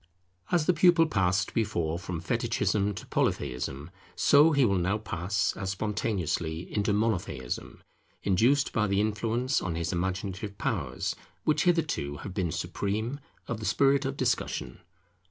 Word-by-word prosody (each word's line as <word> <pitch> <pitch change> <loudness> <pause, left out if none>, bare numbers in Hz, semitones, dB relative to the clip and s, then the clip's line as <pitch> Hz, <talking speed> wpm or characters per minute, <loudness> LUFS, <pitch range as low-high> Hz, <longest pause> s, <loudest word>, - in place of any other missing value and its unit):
As 170 -4 +3
the 180 - +4
pupil 170 0 +5
passed 95 - +1
before 85 -7 0
from 90 -2 -5
Fetichism 100 +3 0
to - - -7
Polytheism, 70 +5 -2 0.2
so 150 +3 +6
he 140 -4 +4
will 100 -4 +2
now 95 +4 +1
pass, 100 0 -1
as 95 -2 -4
spontaneously, 95 -5 -2
into 105 0 +1
Monotheism, 100 - -2 0.4
induced 120 +9 +3
by 105 -1 +2
the 100 0 +1
influence 115 +5 0
on 85 -3 -2
his 85 +1 -2
imaginative 95 +3 -3
powers - - -2 0.3
which 155 +4 +2
hitherto 160 - +1
have 100 - -6
been 90 -4 -1
supreme, 110 - -2 0.3
of 120 - -3
the - - -7
spirit 140 0 +3
of 135 0 -3
discussion. 120 - -1
100 Hz, 140 wpm, -28 LUFS, 90-125 Hz, 0.4 s, so